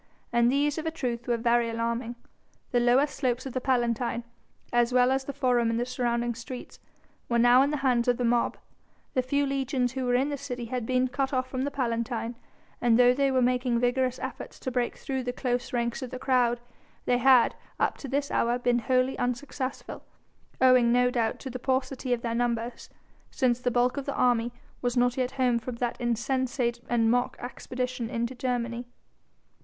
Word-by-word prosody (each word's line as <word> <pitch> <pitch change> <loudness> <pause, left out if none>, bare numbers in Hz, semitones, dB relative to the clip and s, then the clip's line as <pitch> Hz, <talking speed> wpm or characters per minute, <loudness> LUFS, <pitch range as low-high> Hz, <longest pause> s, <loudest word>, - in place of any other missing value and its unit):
And 235 0 +4
these, 290 +2 +1
of 320 - -4
a - - +2
truth, 245 -7 -4
were 240 -1 +1
very 235 0 +2
alarming. 230 +1 -2 0.6
The 245 - +3
lower 245 +4 +4
slopes 260 -3 -2
of 265 - -5
the 255 - -2
Palatine, 240 -2 0 0.5
as 240 0 +3
well 250 0 +4
as 265 0 0
the 280 - -3
Forum 250 -4 +1
and 230 0 0
the 240 - 0
surrounding 240 -1 -1
streets, 235 +2 -9 0.5
were 235 - +2
now 245 +2 +6
in 280 - +3
the 300 - -1
hands 245 -2 +2
of 245 -1 +3
the 245 - 0
mob. 235 0 +1 0.6
The 255 - +2
few 280 +3 0
legions 270 -2 0
who 260 0 -3
were 245 0 +2
in 265 +3 +2
the 290 - -3
city 250 -3 -5
had 240 -1 -4
been 255 0 +2
cut 270 +2 -2
off 255 0 0
from 260 +1 -2
the - - -1
Palatine, 235 -3 -2 0.5
and 235 -2 +4
though 245 0 +6
they 275 +1 +2
were 260 -1 +2
making 250 -1 +1
vigorous 250 +1 +1
efforts 260 -2 -7
to 260 - -3
break 245 -1 -1
through 265 -1 -3
the 245 0 -2
close 245 -1 -2
ranks 235 0 -1
of 255 - -5
the 255 - -6
crowd, 250 -2 +2 0.5
they 245 0 +2
had, 255 -1 +5 0.3
up - - +1
to 280 - -7
this 280 +2 -1
hour, 240 +1 +1
been 245 -1 +1
wholly 255 +1 +1
unsuccessful, 255 +2 -4 0.6
owing 255 -2 +5
no 250 +1 +3
doubt 230 -3 0
to 265 - -6
the 255 - -5
paucity 260 0 -1
of 240 -1 0
their 230 -1 -1
numbers, 235 0 -2 0.4
since 250 -3 +1
the 250 - 0
bulk 245 +2 +1
of 280 - -4
the 280 - -2
army 240 -1 +2 0.3
was 245 0 -1
not 245 0 +3
yet 255 -1 -1
home 250 -3 +2
from 245 +1 -6
that 240 +1 -3
insensate 240 0 0
and 230 -2 +3
mock 245 0 0
expedition 250 -1 -4
into 235 0 -2
Germany. 240 -1 -2
245 Hz, 200 wpm, -27 LUFS, 240-260 Hz, 0.6 s, now